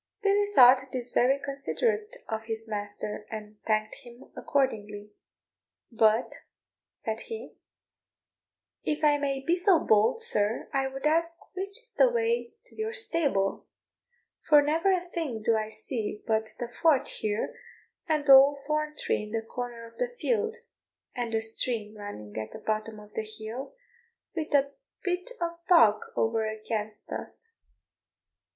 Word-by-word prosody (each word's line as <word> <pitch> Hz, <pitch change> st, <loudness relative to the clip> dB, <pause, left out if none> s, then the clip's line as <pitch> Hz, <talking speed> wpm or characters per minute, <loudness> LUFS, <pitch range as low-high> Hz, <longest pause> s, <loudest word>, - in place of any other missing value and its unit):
Billy 405 Hz, 0 st, +3 dB
thought 255 Hz, +1 st, +9 dB
this 250 Hz, -1 st, -2 dB
very 260 Hz, +3 st, +4 dB
considerate 425 Hz, -, -2 dB
of 220 Hz, 0 st, -4 dB
his 225 Hz, 0 st, -4 dB
master, 210 Hz, 0 st, -4 dB
and 215 Hz, -1 st, -7 dB
thanked 215 Hz, -1 st, 0 dB
him 240 Hz, +1 st, -14 dB
accordingly: 210 Hz, -6 st, -1 dB, 0.8 s
"But," 220 Hz, 0 st, +2 dB, 0.5 s
said 220 Hz, 0 st, -4 dB
he, 450 Hz, -1 st, -7 dB, 1.3 s
"if 305 Hz, +1 st, -2 dB
I 295 Hz, -1 st, +5 dB
may 275 Hz, -1 st, -1 dB
be 340 Hz, -, +3 dB
so 360 Hz, -1 st, +4 dB
bold, 215 Hz, -, +3 dB
sir, 215 Hz, -, +1 dB
I 270 Hz, -1 st, +1 dB
would 270 Hz, +1 st, -6 dB
ask 335 Hz, +2 st, +2 dB, 0.2 s
which 395 Hz, +3 st, -3 dB
is 475 Hz, -1 st, -12 dB
the -, -, +5 dB
way 470 Hz, -1 st, 0 dB
to -, -, -18 dB
your 440 Hz, +1 st, -3 dB
stable, 285 Hz, -, 0 dB, 0.7 s
for 295 Hz, -2 st, +6 dB
never 325 Hz, +6 st, +2 dB
a 360 Hz, -1 st, 0 dB
thing 290 Hz, -11 st, -4 dB
do 225 Hz, +1 st, +3 dB
I 215 Hz, 0 st, -1 dB
see 220 Hz, -1 st, -3 dB
but 220 Hz, -1 st, 0 dB
the 240 Hz, -, -4 dB
fort 290 Hz, -5 st, +4 dB
here, 210 Hz, 0 st, -2 dB, 0.5 s
and 305 Hz, -3 st, +1 dB
the 275 Hz, -, +9 dB
old 275 Hz, +2 st, +8 dB
thorn 305 Hz, 0 st, -1 dB
tree -, -, 0 dB
in 210 Hz, -, -7 dB
the 225 Hz, 0 st, -2 dB
corner 240 Hz, 0 st, -6 dB
of 230 Hz, -, -16 dB
the -, -, +1 dB
field, 445 Hz, -1 st, 0 dB, 0.6 s
and 240 Hz, -2 st, -3 dB
the 225 Hz, 0 st, +1 dB
stream 220 Hz, -1 st, -2 dB
running 205 Hz, -, -8 dB
at 110 Hz, 0 st, -5 dB
the -, -, -6 dB
bottom 215 Hz, 0 st, -3 dB
of 210 Hz, 0 st, -15 dB
the -, -, -1 dB
hill, 220 Hz, -, -7 dB, 0.6 s
with 320 Hz, -2 st, -2 dB
the 280 Hz, -1 st, +3 dB, 0.3 s
bit 365 Hz, +5 st, -1 dB
of 340 Hz, 0 st, -3 dB
bog 230 Hz, -, +6 dB
over 225 Hz, -1 st, +1 dB
against 215 Hz, -1 st, -5 dB
us." 455 Hz, -, -7 dB
255 Hz, 150 wpm, -28 LUFS, 220-335 Hz, 1.3 s, thought